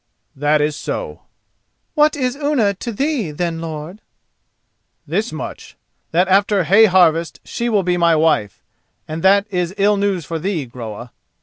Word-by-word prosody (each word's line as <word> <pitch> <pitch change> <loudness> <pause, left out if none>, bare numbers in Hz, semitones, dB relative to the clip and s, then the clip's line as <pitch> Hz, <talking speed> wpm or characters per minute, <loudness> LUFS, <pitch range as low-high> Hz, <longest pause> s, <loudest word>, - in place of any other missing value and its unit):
"That 150 +2 +2
is 150 0 0
so." - - -5 0.7
"What 300 -1 +3
is 255 -3 -1
Unna 280 -8 +1
to 235 +5 -6
thee, 270 - -1
then, 165 +2 -3
lord?" 160 +5 -7 1.0
"This 200 +10 -2
much, 155 - -8 0.3
that 180 +3 +2
after 195 0 +3
hay 200 +8 +6
harvest 170 -4 +3
she 235 0 -3
will 210 -4 +2
be 180 0 0
my 170 -1 +3
wife, 155 - +1 0.4
and 155 +1 -5
that 200 +2 +4
is 180 0 -2
ill 205 +1 +3
news 195 -5 -1
for 165 +1 -4
thee, 170 -4 -2
Groa." 120 -1 -8
180 Hz, 150 wpm, -19 LUFS, 160-205 Hz, 1.0 s, hay